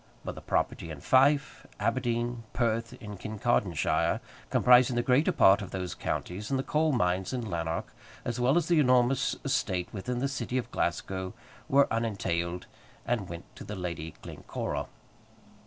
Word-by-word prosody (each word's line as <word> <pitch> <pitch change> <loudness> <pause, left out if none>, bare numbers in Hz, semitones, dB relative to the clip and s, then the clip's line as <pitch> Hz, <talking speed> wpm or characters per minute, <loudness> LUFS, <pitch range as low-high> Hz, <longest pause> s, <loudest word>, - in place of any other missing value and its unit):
But - - -3
the - - -10
property 85 - -1
in 75 -3 -7
Fife, 140 - +3
Aberdeen, 120 -1 0
Perth, 115 -1 0
and 105 -3 -8
Kincardine 105 -4 0
shire, - - +1 0.3
comprising 125 0 +5
the 120 - +1
greater 135 +9 +3
part 110 - +5
of 100 - -6
those 90 -1 -4
counties, 100 +4 -4
and 135 - +1
the 130 - -1
coal 155 +2 +2
mines 90 -5 0
in 120 -3 -2
Lanark, 80 -3 -3 0.3
as 120 0 -2
well 130 +6 +3
as 170 -2 +1
the 170 -3 +4
enormous 125 -1 +3
estate 90 -1 0
within 120 +5 -3
the 135 +3 0
city 135 -2 -3
of 120 -1 -3
Glasgow, 95 +2 -2 0.3
were 140 +1 +5
unentailed, 90 -6 -1 0.4
and 115 -6 -1
went 85 -1 -9
to - - -9
the 105 - -6
Lady 85 -4 -5
Glencora. - - -4
115 Hz, 160 wpm, -29 LUFS, 95-130 Hz, 0.4 s, comprising